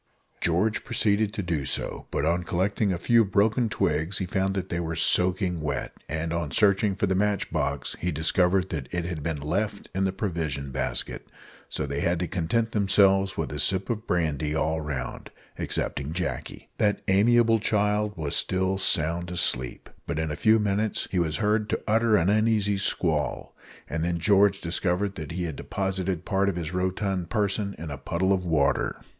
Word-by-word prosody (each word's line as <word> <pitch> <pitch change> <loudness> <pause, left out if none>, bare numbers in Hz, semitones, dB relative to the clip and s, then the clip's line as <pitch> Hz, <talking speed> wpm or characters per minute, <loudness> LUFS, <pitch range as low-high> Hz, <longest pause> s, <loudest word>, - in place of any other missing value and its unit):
George 90 +6 +1
proceeded 105 0 +1
to 105 -2 -4
do 85 -5 -1
so; 65 - -3
but - - -1
on 85 +2 +1
collecting 95 +4 0
a 90 - -1
few 115 +6 +4
broken 110 +4 +2
twigs 90 -3 0
he 95 - -2
found 95 +1 -1
that 95 -1 -3
they 85 - -2
were 80 -1 -3
soaking 90 0 +3
wet, 75 -1 -3 0.2
and 80 +2 -2
on 85 -3 -2
searching 100 +3 +3
for 100 - 0
the 95 - +1
match 100 +1 0
box - - -2
he 90 - -1
discovered 90 +4 +2
that 70 -5 -5
it 90 -1 -2
had 85 -3 -4
been 80 0 -3
left 100 +8 -2
in 95 +1 0
the 95 - +1
provision 80 -9 -3
basket, 65 -2 -3 0.4
so - - -2
they 70 0 -3
had 85 0 +1
to 90 +1 -2
content 105 +7 -1
themselves 95 -1 +3
with 80 - -2
a 75 - -4
sip 95 - +3
of 110 0 -4
brandy 75 -3 0
all 80 0 0
round 75 -4 -5 0.3
excepting 70 +3 -2
Jacky. 90 -1 -4
That 105 -1 +1
amiable 115 +3 +4
child 105 0 0
was 75 -3 -2
still 95 +1 0
sound 85 -1 0
asleep; 65 -8 -1 0.2
but 80 - -2
in 80 -1 -1
a - - -2
few 110 +8 +4
minutes 105 0 0
he 95 - +1
was 80 -3 0
heard 105 0 +1
to - - -1
utter 110 0 +3
an 85 - +2
uneasy 105 -1 +2
squall, 100 - -1 0.3
and 80 +1 -2
then 85 0 0
George 100 +2 +3
discovered 90 +3 0
that 75 -3 -7
he 90 +1 -2
had 80 -4 -3
deposited 95 -2 -3
part 100 -1 +1
of 95 - -2
his 85 -1 -4
rotund 95 0 -1
person 100 -2 -1
in 80 0 -6
a 70 - -6
puddle 95 +3 0
of 95 -1 -1
water. 80 -5 +1
95 Hz, 185 wpm, -26 LUFS, 80-100 Hz, 0.4 s, few